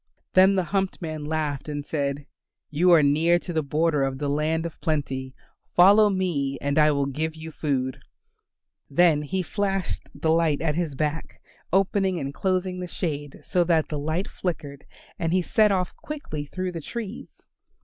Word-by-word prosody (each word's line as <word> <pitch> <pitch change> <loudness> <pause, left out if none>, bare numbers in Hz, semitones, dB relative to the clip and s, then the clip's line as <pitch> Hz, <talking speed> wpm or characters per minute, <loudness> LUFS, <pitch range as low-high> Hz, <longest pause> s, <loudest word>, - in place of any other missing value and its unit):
Then 190 +1 +6
the 185 - +2
humped 195 +1 -1
man 155 -3 -5
laughed 150 -2 -2
and 145 -1 -4
said, 140 -2 -2 0.5
"You 170 +5 +3
are 165 -3 +7
near 160 +5 +4
to 175 0 -6
the 160 - +1
border 150 +1 +1
of 135 -1 0
the 145 0 -2
Land 155 +3 0
of 165 - -7
Plenty; 135 -5 -2 0.4
follow 205 +4 +7
me 170 -8 -1
and 140 +2 0
I 155 0 +6
will 140 -2 +1
give 155 +4 -3
you 160 0 -8
food." 135 -4 -2 0.9
Then 155 0 +4
he 185 +6 -2
flashed 195 0 -2
the 160 - 0
light 160 -3 +2
at 160 -2 0
his 160 -3 -2
back, 150 +2 -3 0.3
opening 190 0 +2
and 140 -1 -4
closing 185 +1 -1
the 180 - -4
shade 145 -5 -4
so 180 -3 +2
that 165 -2 +2
the 150 - -3
light 160 +6 -2
flickered, 145 -6 -5 0.3
and 165 0 0
he 185 -1 +2
set 210 +3 +3
off 185 -2 -1
quickly 220 - -6
through 185 +4 -3
the 165 -2 -6
trees. 220 +5 -7
160 Hz, 175 wpm, -25 LUFS, 145-180 Hz, 0.9 s, are